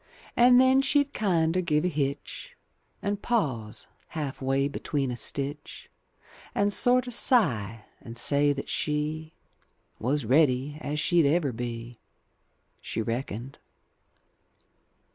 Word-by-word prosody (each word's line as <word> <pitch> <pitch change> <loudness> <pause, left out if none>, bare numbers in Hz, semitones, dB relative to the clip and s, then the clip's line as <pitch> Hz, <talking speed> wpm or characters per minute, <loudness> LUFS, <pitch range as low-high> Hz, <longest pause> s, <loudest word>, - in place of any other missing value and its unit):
And 245 +1 +6
then 260 +1 +5
she'd 285 +1 +2
kinder 175 -4 +1
give 155 -2 +1
a - - +3
hitch, 140 -4 -4 0.5
And 205 0 -2
pause 130 - -1 0.2
half 145 -5 -5
way 135 +1 +1
between 140 -2 -2
a - - -3
stitch. 140 +4 -4 0.6
And 205 0 +2
sorter 250 +2 +2
sigh, 115 - +1 0.2
and 115 0 -9
say 145 +4 +3
that 140 -1 -4
she 155 +1 -2 0.6
Was 130 +3 0
ready 140 +2 +2
as 150 +1 -3
she'd 170 -1 +3
ever 150 -2 +2
be. 120 0 -6 0.8
She - - -4
reckoned. 120 +2 -4
145 Hz, 115 wpm, -27 LUFS, 130-180 Hz, 0.8 s, And